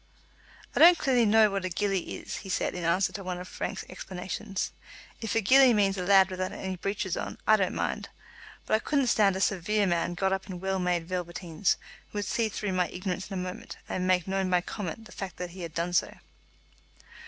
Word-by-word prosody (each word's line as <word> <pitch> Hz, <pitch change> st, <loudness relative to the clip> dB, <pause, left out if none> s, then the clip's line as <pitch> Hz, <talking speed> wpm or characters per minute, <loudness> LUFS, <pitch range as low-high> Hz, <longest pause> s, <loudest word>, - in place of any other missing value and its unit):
"I -, -, +1 dB
don't 345 Hz, +1 st, +9 dB
clearly 250 Hz, -7 st, +3 dB
know 215 Hz, 0 st, +5 dB
what 195 Hz, -1 st, -2 dB
a 185 Hz, -, -1 dB
gillie 195 Hz, 0 st, -1 dB
is," -, -, -6 dB
he 190 Hz, -, -9 dB
said, -, -, 0 dB
in 180 Hz, -, -5 dB
answer 175 Hz, +4 st, +2 dB
to 195 Hz, -, -6 dB
one 180 Hz, -1 st, -4 dB
of 180 Hz, -, -7 dB
Frank's -, -, -4 dB
explanations. 190 Hz, +2 st, -5 dB, 0.5 s
"If 225 Hz, -1 st, -2 dB
a 225 Hz, -, +3 dB
gillie 255 Hz, +3 st, +6 dB
means 200 Hz, -2 st, +3 dB
a 185 Hz, -, -3 dB
lad 190 Hz, 0 st, +5 dB
without 185 Hz, 0 st, -2 dB
any 190 Hz, -1 st, -4 dB
breeches 195 Hz, 0 st, -2 dB
on, -, -, -5 dB
I 215 Hz, -, +6 dB
don't 190 Hz, -3 st, 0 dB
mind; -, -, -2 dB, 0.6 s
but -, -, -2 dB
I 215 Hz, -, +5 dB
couldn't 280 Hz, +3 st, +1 dB
stand 210 Hz, -5 st, +3 dB
a -, -, -2 dB
severe 205 Hz, +2 st, +1 dB
man 175 Hz, -1 st, 0 dB
got 190 Hz, +1 st, +1 dB
up 190 Hz, +1 st, -4 dB
in 180 Hz, -2 st, -5 dB
well 190 Hz, +1 st, -1 dB
made 175 Hz, -2 st, 0 dB
velveteens, 175 Hz, -1 st, -1 dB, 0.3 s
who -, -, -7 dB
would 205 Hz, -, -1 dB
see 225 Hz, +2 st, 0 dB
through 205 Hz, -2 st, -3 dB
my 180 Hz, -1 st, +2 dB
ignorance 185 Hz, +1 st, -4 dB
in 195 Hz, -, -5 dB
a 180 Hz, -, -2 dB
moment, 180 Hz, 0 st, -7 dB
and 185 Hz, 0 st, -2 dB
make 180 Hz, -1 st, +2 dB
known 190 Hz, -1 st, 0 dB
by 180 Hz, -1 st, +3 dB
comment 205 Hz, +3 st, -6 dB
the -, -, -14 dB
fact 190 Hz, -3 st, -6 dB
that 180 Hz, -1 st, -5 dB
he 185 Hz, +1 st, -9 dB
had 165 Hz, -2 st, -7 dB
done 170 Hz, +1 st, -1 dB
so." 175 Hz, -, +2 dB
190 Hz, 220 wpm, -28 LUFS, 180-205 Hz, 0.6 s, don't